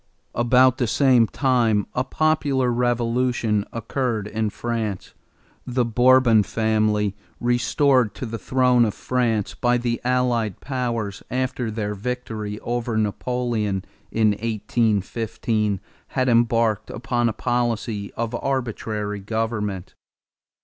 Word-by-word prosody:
About 125 +2 +4
the 120 - +1
same 125 -1 +4
time 115 -7 +2
a 125 - 0
popular 140 -3 +1
revolution 120 -3 +1
occurred 115 -1 -2
in 110 0 -1
France. 110 -4 -4 0.5
The 125 -1 0
Bourbon 125 -1 +5
family, 110 -2 +1 0.2
restored 120 -1 +2
to - - -5
the 115 -1 -5
throne 125 +3 +3
of 110 -3 0
France 115 -5 0
by 120 0 +1
the 120 -1 -2
allied 120 -5 0
powers 120 -7 -3
after 130 -1 -2
their 105 -1 -3
victory 110 -1 -4
over 120 -1 -2
Napoleon 110 -2 -1 0.3
in 110 -1 +3
1815, 110 -1 -1 0.4
had 130 0 +2
embarked 115 -2 +2
upon 120 -1 0
a - - 0
policy 115 -3 -2
of 115 0 -3
arbitrary 110 -5 -2
government. 105 -2 -3
115 Hz, 110 wpm, -23 LUFS, 105-125 Hz, 0.5 s, Bourbon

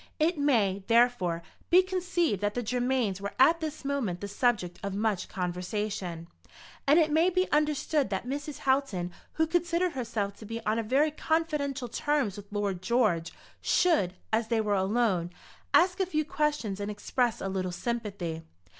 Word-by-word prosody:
It 320 0 +1
may, 215 -9 +2
therefore, 230 -8 +3 0.3
be 360 +2 +7
conceived 355 - 0
that 205 0 0
the 245 - -1
Germains 245 -4 0
were 200 - -5
at 330 +6 +5
this 310 -2 -5
moment 255 -11 -1
the 200 - -5
subject 200 -5 0
of 200 -1 -3
much 205 -3 -1
conversation, 180 -1 -3 0.6
and 290 +3 +6
it 315 -3 +4
may 325 +4 +4
be 370 +1 +1
understood 300 -2 +1
that 195 +3 -2
Mrs. 290 +3 -4
Houghton, 265 -10 +1 0.2
who 320 - +2
considered 345 +2 +1
herself 225 -7 -2
to 220 - -11
be 230 +1 -4
on 220 +2 +1
very 285 +6 +3
confidential 300 -5 -1
terms 275 -4 0
with 205 0 -11
Lord 200 -3 -2
George, 185 -6 +1 0.3
should, 295 - +2 0.2
as 220 0 +2
they 230 0 +1
were 210 -1 +1
alone, 190 -3 +1 0.4
ask 360 +2 +4
a 380 - +1
few 310 -3 0
questions 295 -11 -1
and 205 0 -3
express 230 +3 -1
a - - -3
little 190 -1 -2
sympathy. 200 -6 -3
235 Hz, 165 wpm, -29 LUFS, 200-300 Hz, 0.6 s, be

